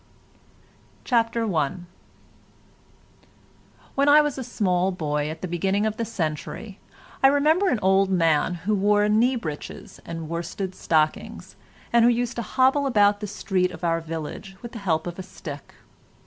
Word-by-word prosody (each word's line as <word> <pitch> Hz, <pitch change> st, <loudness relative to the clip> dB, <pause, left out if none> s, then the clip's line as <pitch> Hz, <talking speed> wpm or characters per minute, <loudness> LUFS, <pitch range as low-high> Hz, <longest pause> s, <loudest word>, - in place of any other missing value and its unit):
CHAPTER 230 Hz, -2 st, +1 dB
I 150 Hz, 0 st, +1 dB, 2.2 s
When 280 Hz, +1 st, +3 dB
I 295 Hz, +1 st, +8 dB
was 295 Hz, -3 st, -2 dB
a -, -, -3 dB
small 185 Hz, -4 st, 0 dB
boy 150 Hz, -4 st, -2 dB
at 160 Hz, +2 st, -8 dB
the -, -, -1 dB
beginning 190 Hz, +4 st, 0 dB
of 215 Hz, 0 st, -2 dB
the 230 Hz, -, -1 dB
century 190 Hz, +2 st, -4 dB, 0.4 s
I 270 Hz, -, +7 dB
remember 310 Hz, +7 st, +3 dB
an 250 Hz, -, +1 dB
old 190 Hz, +1 st, +4 dB
man 165 Hz, -1 st, +2 dB
who 215 Hz, -, +2 dB
wore 205 Hz, +1 st, +3 dB
knee 230 Hz, +5 st, +3 dB
breeches 155 Hz, -10 st, -7 dB
and 165 Hz, -1 st, -6 dB
worsted 170 Hz, +3 st, -4 dB
stockings, 155 Hz, -4 st, -1 dB, 0.4 s
and 235 Hz, -1 st, +6 dB
who 240 Hz, -, +6 dB
used 240 Hz, 0 st, 0 dB
to -, -, -1 dB
hobble 265 Hz, +4 st, +2 dB
about 205 Hz, -4 st, +3 dB
the 210 Hz, -, -5 dB
street 190 Hz, -2 st, 0 dB
of 180 Hz, -, -11 dB
our 165 Hz, -1 st, +1 dB
village 165 Hz, +4 st, -6 dB
with 235 Hz, -, -7 dB
the 230 Hz, -, -7 dB
help 160 Hz, -5 st, 0 dB
of 175 Hz, +1 st, -6 dB
a -, -, -4 dB
stick. 150 Hz, -6 st, -10 dB
195 Hz, 160 wpm, -24 LUFS, 165-230 Hz, 2.2 s, I